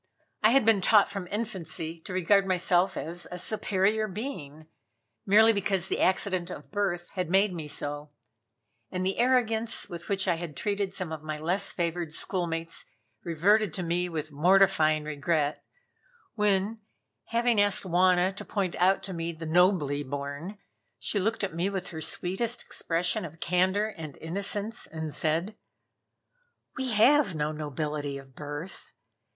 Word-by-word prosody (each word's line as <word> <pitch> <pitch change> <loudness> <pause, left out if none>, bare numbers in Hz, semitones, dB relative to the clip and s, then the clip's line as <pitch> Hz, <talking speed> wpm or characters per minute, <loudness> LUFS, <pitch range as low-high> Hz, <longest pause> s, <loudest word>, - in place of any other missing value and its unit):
I 215 - +6
had 265 -1 +4
been 220 -3 +4
taught 205 +1 +5
from 195 -3 -5
infancy 170 -6 -4
to 160 - -9
regard 190 +2 +4
myself 185 0 +2
as 170 +2 -4
a 180 - -6
superior 210 +2 +1
being, 180 - -6 0.6
merely 220 +3 +6
because 195 -2 0
the - - -1
accident 185 -1 +1
of - - -9
birth 185 -4 -2
had 180 -4 -2
made 195 +1 +3
me 160 -3 -5
so, 145 0 -4 0.8
and 185 0 -2
the 190 +3 -1
arrogance 235 -2 +2
with 170 +2 -8
which 195 -1 +1
I 175 -2 +2
had 165 -4 -7
treated 200 -2 -1
some 185 -4 -5
of 160 -2 -5
my 155 0 -4
less 180 +6 -1
favored 170 -2 -2
schoolmates 165 -2 -3 0.4
reverted 185 +4 +2
to 185 - -2
me 175 +1 0
with 155 -2 -4
mortifying 160 -1 +4
regret, 150 0 -1 0.7
when, 210 0 +1 0.5
having 235 -2 +2
asked 205 0 +2
Wauna 185 +1 +3
to - - -5
point 190 -5 -2
out 190 +2 +3
to 190 -1 -4
me 165 0 -3
the 165 0 -8
nobly 160 -4 +3
born, 145 +7 -5 0.4
she 205 - -1
looked 220 +3 -1
at 190 -3 -2
me 175 +4 0
with 190 -2 -4
her 160 -2 -7
sweet 180 +5 +1
expression 180 -8 -1
of 165 -1 -9
candor 185 +5 +1
and 160 -8 -9
innocence 200 +6 -3
and 160 -2 -5
said: 170 +6 0 1.2
"We 260 -3 -2
have 235 - +5
no 150 0 -1
nobility 150 -1 -3
of 135 -1 -13
birth. 145 +6 -7
180 Hz, 155 wpm, -28 LUFS, 160-200 Hz, 1.2 s, I